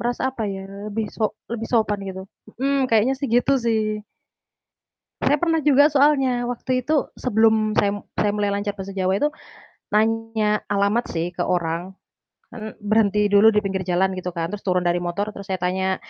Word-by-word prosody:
merasa 240 Hz, +1 st, -2 dB
apa 230 Hz, -, -5 dB
ya, 195 Hz, 0 st, -5 dB, 0.2 s
lebih 215 Hz, +1 st, -2 dB
so 215 Hz, -2 st, -2 dB, 0.2 s
lebih 230 Hz, -1 st, -4 dB
sopan 215 Hz, -3 st, +2 dB
gitu. 190 Hz, 0 st, -6 dB, 0.4 s
Hmm, 275 Hz, -1 st, +1 dB
kayaknya 225 Hz, +3 st, +3 dB
sih, 280 Hz, -, -2 dB
gitu 245 Hz, +4 st, +3 dB
sih. 215 Hz, -2 st, 0 dB, 1.2 s
Saya 290 Hz, -, +3 dB
pernah 330 Hz, -1 st, +2 dB
juga 290 Hz, 0 st, +6 dB
soalnya, 270 Hz, -4 st, +3 dB
waktu 255 Hz, +1 st, -2 dB
itu 305 Hz, -2 st, +1 dB
sebelum 220 Hz, -2 st, +2 dB
saya 205 Hz, -, +3 dB
mu -, -, -13 dB
saya 210 Hz, -, +1 dB
mulai 205 Hz, -1 st, 0 dB
lancar 205 Hz, 0 st, -3 dB
bahasa 195 Hz, 0 st, -6 dB
Jawa 190 Hz, 0 st, +1 dB
itu, 295 Hz, -, +1 dB, 0.6 s
nanya 220 Hz, -1 st, +1 dB
alamat 205 Hz, +4 st, +1 dB
sih 165 Hz, +1 st, -1 dB
ke 180 Hz, -, -3 dB
orang, 175 Hz, +1 st, -2 dB, 0.6 s
kan 220 Hz, -3 st, -8 dB
berhenti 210 Hz, -1 st, +2 dB
dulu 205 Hz, +2 st, +6 dB
di 210 Hz, -, +3 dB
pinggir 190 Hz, -2 st, -3 dB
jalan 185 Hz, +2 st, +2 dB
gitu 180 Hz, -1 st, -6 dB
kan 165 Hz, +1 st, -2 dB
terus 210 Hz, -1 st, -6 dB
turun 180 Hz, -1 st, +2 dB
dari 175 Hz, 0 st, +1 dB
motor 180 Hz, +4 st, -3 dB
terus 200 Hz, -1 st, -10 dB
saya 190 Hz, -, -1 dB
tanya, 185 Hz, +1 st, 0 dB
210 Hz, 180 wpm, -22 LUFS, 190-235 Hz, 1.2 s, juga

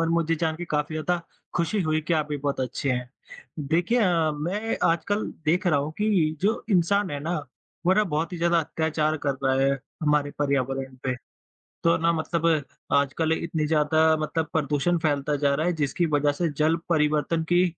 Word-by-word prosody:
और 165 Hz, -, +1 dB
मुझे 165 Hz, -1 st, +1 dB
जान 160 Hz, 0 st, 0 dB
के 175 Hz, -, -5 dB
काफ़ी 150 Hz, +1 st, -1 dB
ज़्यादा 170 Hz, +3 st, -1 dB, 0.3 s
खुशी 175 Hz, +4 st, 0 dB
हुई 155 Hz, -1 st, +1 dB
कि 155 Hz, +2 st, -2 dB
आप 155 Hz, -1 st, +1 dB
भी 145 Hz, -, -2 dB
बहुत 140 Hz, -1 st, -2 dB
अच्छे 130 Hz, +2 st, -2 dB
हैं। 125 Hz, 0 st, -2 dB, 0.6 s
देखिए 175 Hz, +10 st, +2 dB
अ, 170 Hz, -6 st, +3 dB
मैं 185 Hz, +9 st, -2 dB
आजकल 175 Hz, +6 st, 0 dB, 0.2 s
देख 180 Hz, +5 st, +1 dB
रहा 155 Hz, -5 st, +4 dB
हूँ 145 Hz, +2 st, -3 dB
कि 185 Hz, -8 st, +2 dB
जो 210 Hz, +4 st, 0 dB
इंसान 195 Hz, +2 st, +2 dB
है 145 Hz, -, -3 dB
ना, 170 Hz, +3 st, -2 dB, 0.5 s
वो 185 Hz, -, +6 dB
ना 215 Hz, +2 st, +3 dB
बहुत 165 Hz, -1 st, -2 dB
ही -, -, -3 dB
ज़्यादा 170 Hz, 0 st, +3 dB
अत्याचार 160 Hz, 0 st, -1 dB
कर 140 Hz, -1 st, +1 dB
रहा 130 Hz, 0 st, +3 dB
है 135 Hz, 0 st, +3 dB, 0.3 s
हमारे 150 Hz, -1 st, +2 dB
पर्यावरण 135 Hz, -2 st, -1 dB
पे, 130 Hz, -1 st, 0 dB, 0.7 s
तो 170 Hz, -, +4 dB
ना 165 Hz, +1 st, +2 dB
मतलब 165 Hz, 0 st, -1 dB, 0.5 s
आजकल 140 Hz, +3 st, +2 dB
इतनी 160 Hz, -2 st, -1 dB
ज़्यादा 160 Hz, +1 st, +3 dB
मतलब 155 Hz, +1 st, -1 dB
प्रदूषण 155 Hz, +3 st, +1 dB
फैलता 145 Hz, -2 st, 0 dB
जा 140 Hz, 0 st, +2 dB
रहा 155 Hz, +4 st, 0 dB
है, 180 Hz, -, +2 dB
जिसकी 160 Hz, +2 st, 0 dB
वजह 145 Hz, 0 st, +3 dB
से 165 Hz, +3 st, -1 dB
जल 155 Hz, +2 st, +3 dB
परिवर्तन 155 Hz, 0 st, +1 dB
की 175 Hz, +1 st, +5 dB
160 Hz, 190 wpm, -25 LUFS, 145-170 Hz, 0.7 s, वो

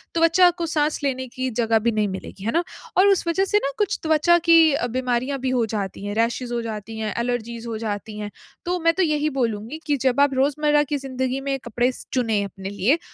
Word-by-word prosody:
त्वचा 335 Hz, +2 st, +5 dB
को 340 Hz, -, 0 dB
साँस 305 Hz, -1 st, 0 dB
लेने 260 Hz, -2 st, -1 dB
की 255 Hz, +1 st, -3 dB
जगह 225 Hz, -1 st, +3 dB
भी 235 Hz, +2 st, +1 dB
नहीं 215 Hz, -1 st, +1 dB
मिलेगी, 190 Hz, 0 st, -8 dB
है 230 Hz, -, +1 dB
ना? 335 Hz, +6 st, +1 dB, 0.3 s
और 380 Hz, +2 st, +6 dB
उस 390 Hz, -3 st, +2 dB
वजह 380 Hz, +3 st, +2 dB
से 415 Hz, -, +2 dB
ना 275 Hz, -, 0 dB
कुछ 415 Hz, -3 st, 0 dB
त्वचा 320 Hz, +2 st, +4 dB
की 330 Hz, -2 st, +7 dB
अ, 245 Hz, -, 0 dB
बीमारियाँ 255 Hz, +2 st, -1 dB
भी 260 Hz, 0 st, -1 dB
हो 245 Hz, -3 st, +2 dB
जाती 205 Hz, -2 st, -4 dB
हैं, 205 Hz, -, -3 dB
रैशेस 235 Hz, +2 st, 0 dB
हो 240 Hz, -1 st, -1 dB
जाती 220 Hz, 0 st, -6 dB
हैं, 215 Hz, -2 st, -2 dB
एलर्जीज़ 235 Hz, -1 st, -3 dB
हो 225 Hz, -, -3 dB
जाती 210 Hz, -1 st, -5 dB
हैं। 210 Hz, 0 st, -5 dB, 0.3 s
तो 355 Hz, +1 st, -1 dB
मैं 330 Hz, 0 st, +3 dB
तो 375 Hz, -, +1 dB
यही 305 Hz, -2 st, +1 dB
बोलूँगी 230 Hz, +5 st, -2 dB
कि 290 Hz, -1 st, +2 dB
जब 260 Hz, +2 st, +2 dB
आप 285 Hz, -1 st, +4 dB
रोज़मर्रा 295 Hz, +2 st, +2 dB
की -, -, +2 dB
ज़िंदगी 260 Hz, -1 st, -3 dB
में 275 Hz, 0 st, -1 dB
कपड़े 240 Hz, +2 st, +1 dB
स -, -, -8 dB
चुनें 225 Hz, -5 st, +1 dB
अपने 195 Hz, -1 st, -7 dB
लिए 205 Hz, -, +1 dB
255 Hz, 230 wpm, -23 LUFS, 225-300 Hz, 0.3 s, की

